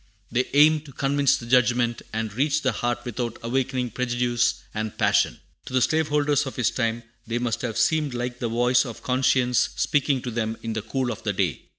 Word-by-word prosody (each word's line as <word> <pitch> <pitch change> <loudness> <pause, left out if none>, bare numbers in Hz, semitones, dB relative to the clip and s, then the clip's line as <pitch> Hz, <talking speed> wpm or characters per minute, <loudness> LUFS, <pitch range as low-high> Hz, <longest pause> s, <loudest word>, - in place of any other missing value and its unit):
They 125 +2 +1
aim 155 +1 +6
to 140 - -11
convince 140 +1 +2
the 120 - -9
judgment 120 -1 +2
and 110 -1 -3
reach 145 +5 +1
the 130 - +2
heart 120 +2 -2
without 120 -1 -4
awakening 125 0 -1
prejudice 120 -1 0
and 110 0 -4
passion. - - +2 0.3
To - - -9
the 130 - +3
slave 160 +3 +1
holders 145 -1 +1
of 130 - -6
his 125 - +1
time 115 -1 -1 0.2
they 115 +1 -1
must 120 -1 -1
have 115 -3 -3
seemed 155 -5 +1
like 120 0 -4
the 120 - -2
voice 125 +2 +3
of 120 -5 -8
conscience 125 -1 +2
speaking 140 -3 +1
to 125 - -4
them 110 -1 -2
in 115 -1 -3
the 110 - -2
cool 125 +3 -2
of 110 - -7
the 105 - -1
day. 90 -8 -1
125 Hz, 205 wpm, -24 LUFS, 115-135 Hz, 0.3 s, aim